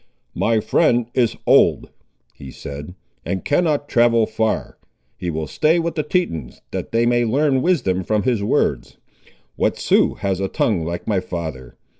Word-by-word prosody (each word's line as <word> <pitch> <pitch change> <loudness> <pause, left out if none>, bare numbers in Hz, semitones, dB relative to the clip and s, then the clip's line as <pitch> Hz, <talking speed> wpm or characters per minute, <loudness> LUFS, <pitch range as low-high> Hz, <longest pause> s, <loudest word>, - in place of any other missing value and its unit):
"My 115 -1 +1
friend 120 +2 +2
is 120 -3 +1
old," - - +4 0.4
he 70 - -11
said, 75 +6 -8 0.3
"and 95 - -4
cannot 150 -2 +1
travel 115 -2 +3
far. 110 0 -2 0.4
He 90 - -4
will 80 -1 -3
stay 155 - +2
with 170 0 -1
the 155 - -1
Tetons, 140 - -2
that - - -5
they 115 +1 +2
may 120 0 +2
learn 135 +3 +2
wisdom 120 - +1
from 105 +2 0
his 120 -5 0
words. 100 - 0 0.6
What - - +1
Sioux - - +2
has 95 -2 -2
a 95 - -1
tongue 95 -3 0
like 85 +2 -4
my 105 -3 +1
father? 80 -9 -6
110 Hz, 160 wpm, -20 LUFS, 90-130 Hz, 0.6 s, old